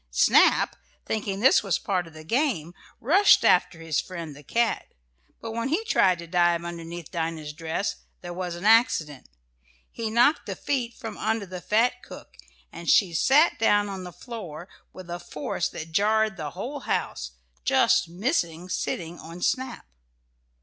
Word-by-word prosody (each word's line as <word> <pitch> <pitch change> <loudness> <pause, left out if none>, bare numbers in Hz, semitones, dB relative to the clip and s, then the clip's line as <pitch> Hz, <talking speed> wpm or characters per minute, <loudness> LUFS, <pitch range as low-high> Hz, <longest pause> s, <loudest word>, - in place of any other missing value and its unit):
Snap, - - +4 0.3
thinking 205 -2 -3
this 265 - +6
was 195 -5 0
part 180 -3 -2
of 165 - -15
the 155 - -10
game, 200 - 0 0.3
rushed 370 - +5
after 165 - +3
his 165 -2 -1
friend 170 -5 -8
the 145 - -12
cat, 230 +9 -1 0.5
but 225 - -6
when 230 +2 -2
he 340 +10 0
tried 185 - +3
to 170 - -8
dive 175 0 +2
underneath 170 -1 -7
Dinah's 160 -2 -3
dress 165 +5 -3 0.2
there 175 -1 -7
was 180 -1 -4
an 175 +3 -7
accident. 165 - +3 0.6
He 225 -1 -4
knocked 240 +7 +3
the - - -4
feet 245 -4 -2
from 225 -2 -8
under 220 -1 -1
the 180 -1 -8
fat 245 +5 +1
cook, - - -12 0.4
and 170 0 -6
she 185 -5 +4
sat 275 - +4
down 205 -2 +3
on 190 -2 -6
the 180 - -8
floor 180 - -8 0.2
with 185 -2 -11
a 175 0 -5
force 150 +1 -3
that 160 +1 -8
jarred 215 +3 +2
the 155 -5 -5
whole 270 +9 -4
house, - - -3 0.3
just - - +3
missing 175 - -2
sitting 170 -1 -3
on 165 +2 -10
Snap. 260 0 -1
185 Hz, 165 wpm, -26 LUFS, 165-225 Hz, 0.6 s, this